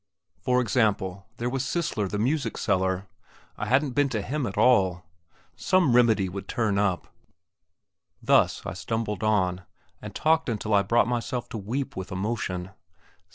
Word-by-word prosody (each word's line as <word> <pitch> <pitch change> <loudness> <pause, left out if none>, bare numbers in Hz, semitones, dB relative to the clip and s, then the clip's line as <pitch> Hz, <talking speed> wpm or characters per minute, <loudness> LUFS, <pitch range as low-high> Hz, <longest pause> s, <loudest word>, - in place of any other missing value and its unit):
For 125 0 +2
example, 100 -5 0
there 120 - -2
was 130 +1 -1
Cisler 155 - -1
the 105 - -3
music 125 +2 0
seller; 95 0 0 0.5
I 105 - -4
hadn't 135 +4 +2
been 145 +2 +2
to 110 -6 -2
him 140 +1 -2
at 100 - -6
all. 95 -7 +3 0.5
Some 175 -9 +2
remedy 110 -5 +4
would 95 +1 -7
turn 105 -4 0
up!.... 95 -4 -1 1.1
Thus - - +2
I - - -4
stumbled 105 +2 -3
on, 95 -4 +1 0.4
and - - -9
talked 160 -2 +2
until 110 -1 -2
I 100 - +5
brought 115 +4 +2
myself 120 0 -2
to 110 - -5
weep 125 +7 -3
with 95 0 -6
emotion. 95 -2 -3
110 Hz, 155 wpm, -26 LUFS, 95-125 Hz, 1.1 s, I